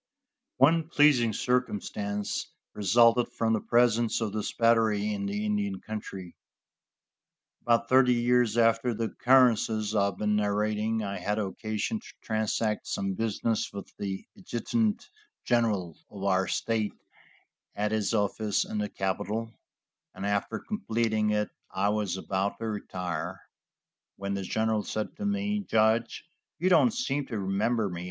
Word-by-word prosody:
One 160 Hz, +5 st, +4 dB
pleasing 145 Hz, -8 st, +4 dB
circumstance 105 Hz, -3 st, -2 dB, 0.3 s
resulted 115 Hz, +4 st, +4 dB
from 115 Hz, -1 st, +1 dB
the 110 Hz, -, 0 dB
presence 120 Hz, -1 st, +2 dB
of 110 Hz, -3 st, -2 dB
this 110 Hz, -1 st, -2 dB
battery 110 Hz, -3 st, +2 dB
in 100 Hz, -1 st, -3 dB
the 105 Hz, +1 st, -2 dB
Indian 100 Hz, -2 st, -1 dB
country. 95 Hz, -4 st, -7 dB, 1.3 s
About 115 Hz, 0 st, +2 dB
thirty 130 Hz, -1 st, +5 dB
years 120 Hz, -1 st, +2 dB
after 115 Hz, +1 st, +3 dB
the 115 Hz, -, -2 dB
occurrences 115 Hz, -4 st, +3 dB
I 100 Hz, -2 st, +3 dB
have 100 Hz, -2 st, -2 dB
been 105 Hz, 0 st, +1 dB
narrating 105 Hz, +1 st, 0 dB
I 100 Hz, -1 st, -4 dB
had 105 Hz, +1 st, -1 dB
occasion 110 Hz, -, -2 dB
to -, -, -14 dB
transact 110 Hz, 0 st, -1 dB
some 95 Hz, 0 st, -2 dB
business 110 Hz, +1 st, -1 dB
with 100 Hz, -1 st, -9 dB
the 95 Hz, -1 st, -4 dB
adjutant 210 Hz, -, -1 dB, 0.4 s
general 105 Hz, -9 st, +1 dB
of 100 Hz, -2 st, -9 dB
our 95 Hz, -1 st, +2 dB
state 110 Hz, -2 st, -1 dB, 0.8 s
at 105 Hz, +1 st, -1 dB
his 110 Hz, 0 st, 0 dB
office 105 Hz, 0 st, 0 dB
in 105 Hz, -, -4 dB
the 105 Hz, 0 st, -2 dB
capitol, 105 Hz, +4 st, -3 dB, 0.6 s
and -, -, -5 dB
after 100 Hz, +2 st, -1 dB
completing 110 Hz, -, -1 dB
it 105 Hz, 0 st, 0 dB, 0.2 s
I 100 Hz, +2 st, 0 dB
was 105 Hz, -3 st, -1 dB
about 95 Hz, +1 st, -2 dB
to 115 Hz, -, -5 dB
retire, 90 Hz, -4 st, -4 dB, 0.8 s
when 100 Hz, 0 st, -4 dB
the 100 Hz, -, -2 dB
general 110 Hz, +3 st, 0 dB
said 110 Hz, +1 st, -4 dB
to 205 Hz, -, -4 dB
me: 205 Hz, +1 st, 0 dB
"Judge, 110 Hz, -, +1 dB, 0.3 s
you 185 Hz, -, +1 dB
don't 180 Hz, +6 st, +6 dB
seem 145 Hz, -, -2 dB
to 115 Hz, -, -4 dB
remember 105 Hz, +3 st, 0 dB
me." 90 Hz, -3 st, -5 dB
110 Hz, 140 wpm, -28 LUFS, 100-120 Hz, 1.3 s, don't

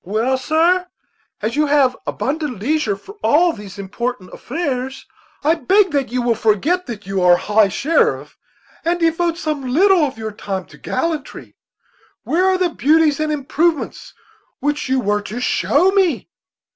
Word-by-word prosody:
"Well, 220 Hz, +7 st, 0 dB
sir, 335 Hz, +6 st, +2 dB, 0.6 s
as 220 Hz, +3 st, -1 dB
you 300 Hz, 0 st, +2 dB
have 280 Hz, -3 st, +3 dB
abundant 290 Hz, -3 st, -2 dB
leisure 260 Hz, -2 st, 0 dB
for 405 Hz, -, -14 dB
all 335 Hz, +3 st, +4 dB
these 205 Hz, -2 st, -10 dB
important 200 Hz, +1 st, -5 dB
affairs, 265 Hz, -3 st, -4 dB, 0.4 s
I 310 Hz, +3 st, +4 dB
beg 380 Hz, +3 st, +2 dB
that 280 Hz, -4 st, -1 dB
you 250 Hz, 0 st, -1 dB
will 240 Hz, -1 st, +2 dB
forget 230 Hz, -, +1 dB
that 215 Hz, -3 st, -7 dB
you 195 Hz, 0 st, -2 dB
are 180 Hz, -1 st, +6 dB
high 210 Hz, +2 st, +3 dB
sheriff, 300 Hz, -, 0 dB, 0.5 s
and 345 Hz, +1 st, 0 dB
devote 330 Hz, 0 st, +1 dB
some 305 Hz, -4 st, -3 dB
little 360 Hz, +6 st, +4 dB
of 270 Hz, -5 st, -2 dB
your 220 Hz, -1 st, -5 dB
time 195 Hz, -2 st, -5 dB
to -, -, -15 dB
gallantry. 315 Hz, -3 st, -4 dB, 0.7 s
Where 360 Hz, +3 st, +1 dB
are 380 Hz, 0 st, +3 dB
the 365 Hz, -1 st, +1 dB
beauties 310 Hz, -1 st, +2 dB
and 310 Hz, 0 st, 0 dB
improvements 305 Hz, +2 st, -1 dB, 0.4 s
which 295 Hz, -2 st, -2 dB
you 265 Hz, 0 st, +2 dB
were 210 Hz, -3 st, 0 dB
to 215 Hz, +4 st, -6 dB
show 295 Hz, +7 st, +2 dB
me?" 370 Hz, -, +1 dB
290 Hz, 160 wpm, -19 LUFS, 225-330 Hz, 0.7 s, are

